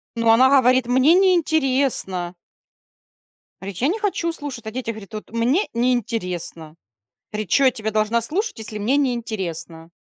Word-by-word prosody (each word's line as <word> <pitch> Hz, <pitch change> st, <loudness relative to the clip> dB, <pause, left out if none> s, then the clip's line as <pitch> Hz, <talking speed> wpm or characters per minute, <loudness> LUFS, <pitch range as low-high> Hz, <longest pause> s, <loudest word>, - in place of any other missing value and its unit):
Ну, 230 Hz, -1 st, +1 dB
она 255 Hz, +4 st, +6 dB
говорит: 255 Hz, -2 st, +4 dB
"Мне 260 Hz, +6 st, +4 dB
неинтересно". 275 Hz, -, +1 dB, 1.2 s
Говорит: 195 Hz, -2 st, -7 dB
"Я 265 Hz, -, +1 dB
не 435 Hz, +5 st, -2 dB
хочу 370 Hz, -5 st, -1 dB
слушать 280 Hz, -8 st, -7 dB
о 220 Hz, -, -5 dB
детях". 235 Hz, -1 st, -4 dB
Говорит: 215 Hz, 0 st, -12 dB
"Вот 215 Hz, 0 st, -8 dB
мне 245 Hz, -, +1 dB
неинтересно". 215 Hz, -10 st, -2 dB, 0.6 s
Говорит: 210 Hz, -3 st, -4 dB
"Чё 275 Hz, -, +4 dB
я 260 Hz, -, +6 dB
тебя 220 Hz, -3 st, -4 dB
должна 215 Hz, +2 st, +1 dB
слушать, 380 Hz, -, -2 dB
если 215 Hz, -1 st, -7 dB
мне 240 Hz, +7 st, +1 dB
неинтересно?" 185 Hz, -, -3 dB
235 Hz, 150 wpm, -21 LUFS, 210-275 Hz, 1.2 s, она